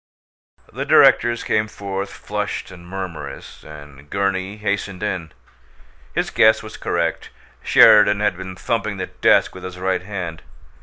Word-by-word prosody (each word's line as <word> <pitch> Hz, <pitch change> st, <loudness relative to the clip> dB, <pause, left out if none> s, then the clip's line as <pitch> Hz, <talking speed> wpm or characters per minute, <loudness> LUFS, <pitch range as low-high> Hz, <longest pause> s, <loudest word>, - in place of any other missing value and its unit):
The -, -, -3 dB
directors 120 Hz, 0 st, +4 dB
came 105 Hz, 0 st, 0 dB
forth, 100 Hz, -1 st, -5 dB
flushed 105 Hz, -2 st, -5 dB
and 85 Hz, -2 st, -13 dB
murmurous, 95 Hz, -3 st, -7 dB
and 75 Hz, -1 st, -13 dB
Gurney 100 Hz, +1 st, -2 dB
hastened 100 Hz, -2 st, -3 dB
in. 90 Hz, -6 st, -3 dB, 0.8 s
His -, -, -1 dB
guess 110 Hz, 0 st, +4 dB
was 110 Hz, -, -9 dB
correct: 85 Hz, -1 st, -2 dB, 0.3 s
Sheridan 105 Hz, -1 st, +6 dB
had 105 Hz, -3 st, +1 dB
been 95 Hz, 0 st, -8 dB
thumping 105 Hz, +1 st, -2 dB
the 95 Hz, -, -3 dB
desk -, -, +2 dB
with -, -, -11 dB
his 95 Hz, -1 st, -7 dB
right 95 Hz, 0 st, -1 dB
hand. 90 Hz, -4 st, -6 dB
95 Hz, 140 wpm, -20 LUFS, 90-105 Hz, 0.8 s, Sheridan